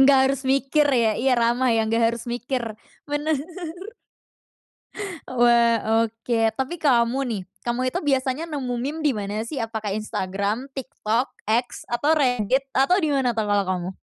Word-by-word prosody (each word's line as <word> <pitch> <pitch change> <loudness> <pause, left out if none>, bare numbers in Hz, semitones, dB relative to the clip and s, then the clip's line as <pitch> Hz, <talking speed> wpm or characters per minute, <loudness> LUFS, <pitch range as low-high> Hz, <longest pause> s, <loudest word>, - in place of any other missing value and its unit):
Nggak 270 0 +7
harus 275 0 -1
mikir 275 +3 +2
ya 225 -4 +3
iya 265 0 +3
ramah 240 +2 +2
ya 225 - +3
nggak 230 +1 +1
harus 235 0 -4
mikir, 245 +1 -2 0.5
bener. 295 +2 0 1.9
Wah, 235 -2 +4
oke. 230 +1 -2 0.2
Tapi 265 +6 -1
kamu 245 -2 +3
nih, 205 -4 -2 0.2
kamu 240 +1 -2
itu - - +1
biasanya 270 +1 0
nemu 260 -5 -3
meme 280 +7 -3
dimana 215 -3 -1
sih, 275 -1 -3
apakah 220 -3 -3
Instagram, 205 +3 -2
TikTok, 250 -2 -2 0.2
X, 240 +3 -1
atau 240 +6 0
Reddit, 255 0 +1
atau 275 +8 +4
dimana 280 -7 +1
tuh 220 -2 -1
kalau 205 -1 +2
kamu? 180 0 -2
240 Hz, 145 wpm, -23 LUFS, 225-270 Hz, 1.9 s, Nggak